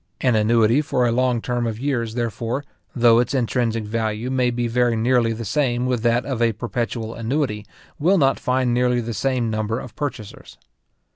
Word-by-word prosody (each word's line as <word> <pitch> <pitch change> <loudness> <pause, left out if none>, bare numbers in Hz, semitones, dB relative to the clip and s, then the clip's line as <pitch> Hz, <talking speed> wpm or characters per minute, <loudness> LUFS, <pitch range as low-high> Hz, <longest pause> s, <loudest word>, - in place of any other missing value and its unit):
An 125 -3 +2
annuity 115 +4 +3
for 125 -4 0
a 120 - +2
long 125 -1 +1
term 120 -1 -1
of 110 -2 -3
years, 120 -5 -2
therefore, 120 +3 -3 0.3
though 120 -2 +5
its 125 +3 0
intrinsic 115 -2 0
value 110 +2 -2
may 130 -2 +2
be 120 0 -1
very 120 0 +1
nearly 115 0 +2
the 115 0 -5
same 125 -1 0
with 125 -3 0
that 120 +1 +1
of 130 -4 -3
a 115 -1 +3
perpetual 115 0 -3
annuity, 115 -3 -2 0.3
will 180 +7 +3
not 135 -4 +2
find 125 -1 0
nearly 125 0 +2
the 115 0 -4
same 125 -2 -1
number 110 +2 -2
of 125 - -10
purchasers. 125 -8 -6
120 Hz, 185 wpm, -22 LUFS, 115-125 Hz, 0.3 s, though